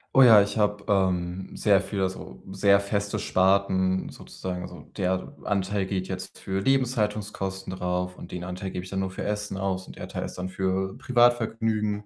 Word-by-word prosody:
Oh 135 - +9
ja, 110 -4 +9
ich 100 +2 -1
habe, 105 -1 +1
ähm, 95 -1 0
sehr 100 -2 +4
viel 100 0 -3
also, 95 -9 -4
sehr 100 +1 +4
feste 100 0 -1
Sparten 95 0 +2
sozusagen. 90 -1 -6
Also, - - -9 0.2
der 95 0 -1
Anteil 100 -1 0
geht 95 -1 -2
jetzt 95 -1 -6
für 95 0 -2
Lebenshaltungskosten 105 -6 0
drauf 90 0 -2
und - - -10
den 90 -1 -5
Anteil 90 +1 -5
gebe 90 - -4
ich 95 - -9
dann 95 0 -2
nur 95 -1 -2
für - - -5
Essen 105 -1 -2
aus. 95 -1 -2
Und - - -12
der - - -6
Teil - - -4
ist - - -7
dann 90 +1 -3
für 95 0 -1
Privatvergnügen, 110 -4 +2
95 Hz, 185 wpm, -26 LUFS, 95-105 Hz, 0.2 s, Oh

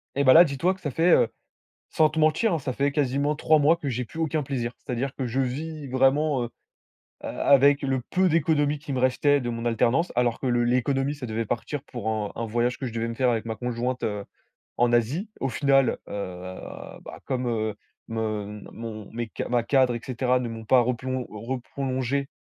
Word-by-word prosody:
Et 140 - +2
bah, 130 - +8
là, 170 - +10
dis-toi 165 +5 0
que 190 - -16
ça 145 - -3
fait, 165 +7 +3
heu, - - +5 0.6
sans 155 -1 +3
te 160 - -3
mentir, 160 +7 +3
hein, 160 - 0
ça 130 - -3
fait 140 +3 0
quasiment 140 +1 0
3 155 +1 +4
mois 150 +3 +4
que 145 -5 -4
j'ai 125 0 -2
plus 160 - -9
aucun 155 -2 0
plaisir. 125 -3 -3
C'est-à-dire 130 +2 -4
que 130 - -3
je 125 +3 -2
vis 150 +3 -4
vraiment, 135 +1 +2
heu, 120 - -4 0.7
a - - -5 0.2
avec 140 +1 +6
le 135 -2 0
peu 185 0 +3
d'économie 150 -2 +2
qui 145 -1 -7
me 130 - -1
restait 140 +3 +3
de 120 - -4
mon 115 0 -4
alternance, 120 +8 +1
alors 120 -1 +2
que - - -4
le 120 -1 +2
l'économie, 135 +3 +1
ça 145 -3 -8
devait 110 +1 -2
partir 130 +6 -3
pour 120 -6 -5
un 110 -2 -1
un 115 - -3
voyage 120 +2 0
que 130 - -4
je 115 - -5
devais 115 0 -2
me 115 - -4
faire 125 +1 +2
avec 115 -2 -1
ma 110 -1 -3
conjointe, 125 +1 -2
heu, 105 -3 -2 0.5
en 120 0 +3
Asie. 140 - +1
Au 135 - 0
final, 135 0 +3
heu, - - -6 0.9
bah, - - -9
comme, 130 -2 -1
heu, 110 -2 -1 0.3
me 105 -2 -3
mon 110 -3 -7
mes 120 0 -4
ca - - -3
ma 120 -1 +2
cadre 130 0 +3
et 120 - -4
cetera, 125 0 +1
ne 120 - -3
m'ont 115 -1 -7
pas 130 +2 +6
replon 125 +1 -2
reprolongé, 130 +4 -3
130 Hz, 215 wpm, -25 LUFS, 120-145 Hz, 0.9 s, là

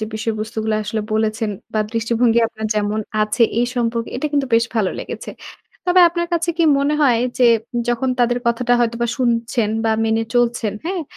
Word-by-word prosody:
যে - - -1
বিষয়বস্তুগুলা 220 0 -2
আসলে 215 +1 -2
বলেছেন, 220 0 0 0.2
বা 215 - +2
দৃষ্টিভঙ্গি 230 0 +2
আপনার 220 -1 -5
যেমন 210 +1 0 0.2
আছে 215 +3 +1 0.2
এই 240 - +2
সম্পর্কে। 230 -1 -1
এটা 270 - -2
কিন্তু 285 -2 +1
বেশ 230 0 +4
ভালো 210 -4 +1
লেগেছে। - - -6 0.6
তবে 360 +1 +5
আপনার 345 0 -2
কাছে 340 0 +1
কি 335 - +3 0.2
মনে 285 +2 +1
হয়? 245 -5 +4 0.2
যে, 250 - +4 0.4
যখন 240 +2 0
তাদের 245 0 +2
কথাটা 235 +1 +1
হয়তোবা 235 0 0
শুনছেন। 235 -2 0 0.2
বা 225 - +2
মেনে 225 0 +1
চলছেন 240 -3 +1
হ্যাঁ? 360 0 -2
235 Hz, 170 wpm, -19 LUFS, 220-245 Hz, 0.6 s, তবে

